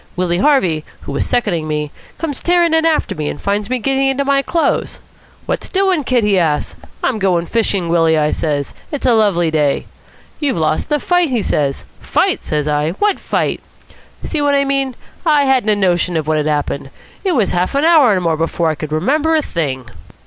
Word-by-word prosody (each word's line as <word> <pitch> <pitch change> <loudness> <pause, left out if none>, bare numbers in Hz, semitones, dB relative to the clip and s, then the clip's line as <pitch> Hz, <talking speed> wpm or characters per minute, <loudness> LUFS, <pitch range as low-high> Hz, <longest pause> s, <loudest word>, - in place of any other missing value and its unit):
Willie 175 -1 0
Harvey, 185 - +2 0.2
who - - -7
was - - -2
seconding 185 -10 0
me, 150 -1 -2 0.3
comes 305 -4 -4
tearing 345 -1 +2
in 320 0 +3
after 315 -2 0
me, 150 -1 -3
and - - -6
finds 205 +1 -2
me 255 - 0
getting 270 +3 0
into 270 +1 0
my 275 0 +3
clothes. 330 +4 -1 0.5
'What's - - -3
doing, 380 -5 +1
Kid?' 250 -3 +1
he 200 -2 +3
asks. 155 -4 -1 0.3
'I'm 245 -4 0
going 180 -3 +1
fishin', 200 -4 0
Willie,' 165 -1 +3
I 150 0 +1
says. 145 -3 -2 0.2
'It's 290 -3 -4
a 250 - +4
lovely 195 -7 +2
day.' 150 -3 +1 0.5
'You've 285 - 0
lost 155 -1 0
the 295 -1 +1
fight,' 355 +1 +2
he 240 -5 0
says. 140 -2 -1 0.2
'Fight?' - - +1
says 150 -1 -2
I. 150 +2 0
'What 410 - 0
fight?' - - -1 0.6
See 310 - -2
what 285 -1 +2
I 280 0 +2
mean? 275 -2 -1 0.3
I 300 -4 +3
hadn't 260 -5 +2
a 210 - +4
notion 180 -3 +1
of 155 -1 -3
what 155 0 +1
had 150 0 0
happened. 145 -2 -2 0.3
It 380 -3 +1
was 220 -7 +1
a - - -1
half 180 +8 0
an 285 +3 +2
hour 310 -8 +6
and 185 -2 0
more 165 -2 +1
before 165 0 0
I - - -4
could 155 -1 -5
remember 295 - +1
a 310 - +2
thing." 135 - -3
205 Hz, 205 wpm, -17 LUFS, -, 0.6 s, hour